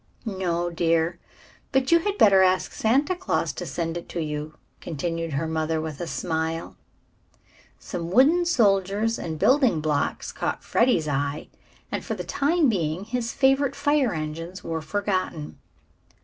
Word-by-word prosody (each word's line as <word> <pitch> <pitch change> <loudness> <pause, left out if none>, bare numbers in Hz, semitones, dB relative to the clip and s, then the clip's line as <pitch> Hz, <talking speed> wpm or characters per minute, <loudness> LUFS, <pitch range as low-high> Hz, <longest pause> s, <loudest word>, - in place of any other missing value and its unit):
"No, 175 -4 -1
dear; 165 0 +1 0.5
but 265 +1 +1
you 335 - +7
had 405 +4 -2
better 195 - +6
ask 185 0 +2
Santa 275 +11 +1
Claus 370 +1 -1
to - - -6
send 165 -1 -3
it 170 - -9
to 175 - -4
you," 150 -1 -4 0.2
continued 165 0 -3
her 140 +4 -1
mother 160 0 -1
with 155 -1 -5
a 175 - -3
smile. 160 -1 -3 1.0
Some 170 -1 -5
wooden 295 - +4
soldiers 210 - +2
and 160 -2 -4
building 255 - +3
blocks 150 -2 -1
caught - - -3
Freddie's 235 -10 +2
eye, 145 +1 -2 0.4
and - - -3
for - - -3
the - - -5
time 305 +2 +2
being 175 -5 -1
his 230 +1 -3
favorite 270 0 +2
fire 290 -5 +2
engines 165 +3 -5
were 165 -1 -3
forgotten. 185 -3 -2
175 Hz, 150 wpm, -25 LUFS, 160-245 Hz, 1.0 s, you